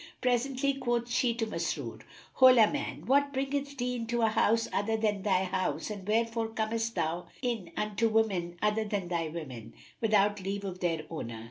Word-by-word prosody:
Presently 260 +2 +1
quoth 240 -3 -1
she 240 -1 +2
to 230 -1 -1
Masrur, 220 - -3 0.3
"Hola 255 -4 +7
man! 290 -1 -4
what 280 +2 +3
bringeth 280 +1 -2
thee 250 0 -1
into 235 0 -1
a 225 - +5
house 225 +1 +2
other 220 +3 +1
than 210 -2 0
thy 190 -2 +2
house 185 +3 -2
and 200 -2 -7
wherefore 230 +1 +1
comest 225 +1 -2
thou 165 +2 -1 0.2
in 230 -8 -2
unto 210 +2 +1
women 190 -6 0
other 210 +1 +2
than 200 -4 -3
thy 170 -2 -1
women, 130 -9 -7 0.2
without 210 -2 +2
leave 200 +1 -3
of 185 -1 -5
their 165 -3 0
owner?" 115 -8 -5
220 Hz, 170 wpm, -30 LUFS, 190-240 Hz, 0.3 s, Hola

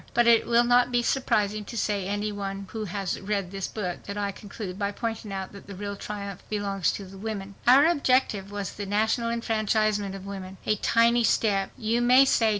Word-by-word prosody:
But 240 0 +4
it 235 -1 +5
will 235 0 +4
not 245 +1 +4
be 240 -1 +2
surprising 215 -5 +1
to 225 -1 -2
any 205 +2 -2
one 195 -1 -5
who 220 -1 -4
has 195 -1 -3
read 200 -2 -2
this 195 -1 -3
book 180 -5 -4
that 200 0 -5
I 200 -1 -1
conclude 200 -1 -8
by 200 0 0
pointing 225 -1 -4
out 190 -1 -4
that 200 - -12
the 200 - -8
real 200 +1 -5
triumph 200 -2 -6
belongs 200 -4 0
to 200 - -6
the 190 +1 -12
women. 200 -2 -5
Our 265 +4 +8
objective 255 - +2
was 205 -2 -4
the 205 -1 -6
national 220 +3 +1
enfranchisement 215 -3 0
of 195 0 -9
women. 190 -1 -7
A 215 - +2
tiny 235 +3 +3
step, 200 -3 +2
you 230 +2 0
may 250 +3 +6
say. 225 -4 +3
205 Hz, 200 wpm, -26 LUFS, 195-230 Hz, -, Our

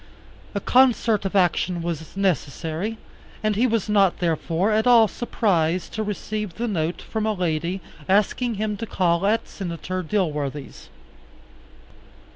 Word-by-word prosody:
A - - +1
concert 235 -3 +3
of 195 - -2
action 180 -1 +2
was 165 +1 -5
necessary, 180 +2 -1 0.5
and 215 -1 +1
he 240 +5 +3
was 225 -4 0
not, 200 -3 +3
therefore, 170 +3 0
at 220 +2 +2
all 235 -3 +7
surprised 185 -7 0
to 220 - -2
receive 210 -2 -4
the 240 +2 -2
note 170 -5 -2
from 220 -1 -2
a 215 - +1
lady 175 0 -1 0.3
asking 215 +4 +2
him 210 0 -2
to 230 - -5
call 175 0 +1
at 225 +2 +1
Senator 185 0 -4
Dilworthy's. 150 -6 -3
195 Hz, 135 wpm, -23 LUFS, 170-215 Hz, 0.5 s, all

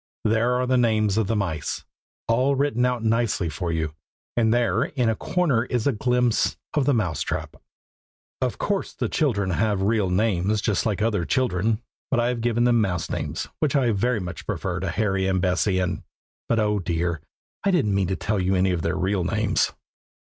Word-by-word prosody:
There 115 +3 +2
are 125 0 +1
the 130 0 +2
names 110 -4 +2
of 110 - 0
the 115 - 0
mice, 90 -7 -2 0.4
all 130 +5 +2
written 135 -3 +1
out 125 -2 -2
nicely 110 -6 +1
for 85 +3 -3
you, 80 -2 -2 0.4
and 115 -2 +3
there 115 0 +2
in 130 -9 0
a 110 - +1
corner 145 - +1
is 120 -3 -1
a 140 - +4
glimpse 125 0 +1 0.2
of 145 -3 +1
the 145 - +4
mouse 90 -10 -1
trap. - - -3 0.9
Of 125 -2 -1
course 200 -1 -2
the - - -2
children 100 - 0
have 100 +1 +1
real 105 -2 +2
names, 100 +1 +1
just 105 +1 0
like 105 -1 0
other 105 -5 +1
children; 110 0 0 0.3
but 130 - +2
I 120 +1 +2
have 120 -2 -2
given 120 0 +1
them 120 -1 +4
mouse 90 -5 -1
names, - - -3
which 150 -3 +1
I 130 -4 +3
very 115 +3 +1
much 90 -2 -7
prefer - - -2
to - - -2
Harry 95 -3 0
and 95 -1 +1
Bessie, 95 +1 +1
and 90 -2 -1 0.5
but 115 - +2
oh! 105 -1 +1
dear, 85 -2 -1 0.4
I 200 - +2
didn't 145 - +2
mean 95 -2 +1
to 95 - -1
tell 105 +1 -1
you 95 +1 +1
any 95 0 +2
of 90 -2 -1
their 85 +3 -1
real 95 0 0
names. 105 +3 +1
110 Hz, 200 wpm, -24 LUFS, 95-120 Hz, 0.9 s, a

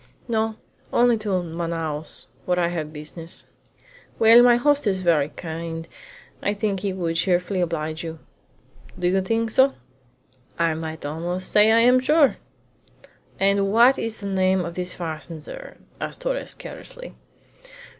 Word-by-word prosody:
"No, 220 -1 0 0.4
only 240 0 +4
to 195 -4 -1
Manaos, 165 -2 -4 0.2
where 180 0 +1
I 170 -1 +2
have 160 -3 -4
business." 160 +2 -8 0.7
"Well, 230 +2 +8
my 245 0 +6
host 285 +1 +2
is 190 -2 +1
very 160 -5 +2
kind, 165 0 -6 0.5
and - - 0
I 205 - -1
think 205 -2 -1
he 200 +1 -2
would 170 -3 -2
cheerfully 180 +1 +1
oblige 160 -2 -2
you." 165 -1 -6 0.8
"Do 180 -1 0
you 190 +1 +2
think 225 +3 -1
so?" 265 +4 +4 0.8
"I 165 -1 +2
might 160 -1 -6
almost 175 +5 -4
say 210 +1 +6
I 230 +1 +5
am 250 +2 +5
sure." 295 +2 +3 1.0
"And 195 0 +3
what 240 +5 +5
is 225 -1 -2
the 200 - -9
name 190 -1 +1
of 170 - -5
this 180 +1 -4
fazender?" 165 - -7 0.2
asked - - -5
Torres - - -2
carelessly. - - -10
185 Hz, 145 wpm, -23 LUFS, 165-225 Hz, 1.0 s, Well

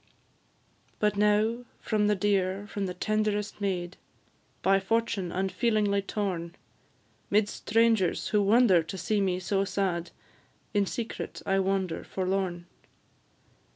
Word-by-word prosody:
But 210 -1 +1
now 210 +3 +2 0.2
from 210 -2 +1
the 210 - +3
dear, 195 -1 0
from 200 -1 -3
the 180 - -5
tenderest 210 +1 -1
maid, 185 -3 -2 0.7
By 195 +1 +4
fortune 200 -3 -1
unfeelingly 200 +2 +1
torn; 185 -4 -3 0.7
'Midst 205 0 +1
strangers, 225 -4 +2
who 210 - +3
wonder 205 -3 +5
to 165 +4 -7
see 210 +2 0
me 185 -2 0
so 195 +2 0
sad, 185 -3 -1 0.6
In 205 -2 +2
secret 230 +3 -5
I 195 0 +2
wander 190 -3 -1
forlorn. 185 -2 -2
200 Hz, 120 wpm, -28 LUFS, 185-210 Hz, 0.7 s, wonder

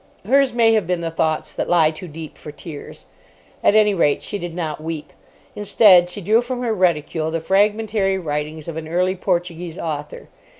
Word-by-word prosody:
Hers 270 +3 +3
may 230 -1 +3
have 215 -6 +1
been 180 -1 -1
the 165 -1 -3
thoughts 160 -1 -1
that - - -3
lie 165 -3 +4
too 160 +3 -9
deep 160 0 -9
for 150 - -10
tears. 150 0 -10 0.6
At 205 - +4
any 210 -1 +5
rate, 150 -6 +1
she 205 - -4
did 175 -2 -6
not 155 -3 -4
weep. 160 -2 -6 0.4
Instead, 200 -3 +5
she 190 +3 -6
drew 215 +6 +3
from 250 0 -4
her 230 -2 0
reticule 165 -4 0
the 165 +1 -2
fragmentary 205 +2 +1
writings 150 -2 -4
of 165 -1 -5
an 160 -1 -6
early 180 +3 0
Portuguese 175 -2 -2
author. 150 -2 -5
175 Hz, 185 wpm, -20 LUFS, 160-205 Hz, 0.6 s, any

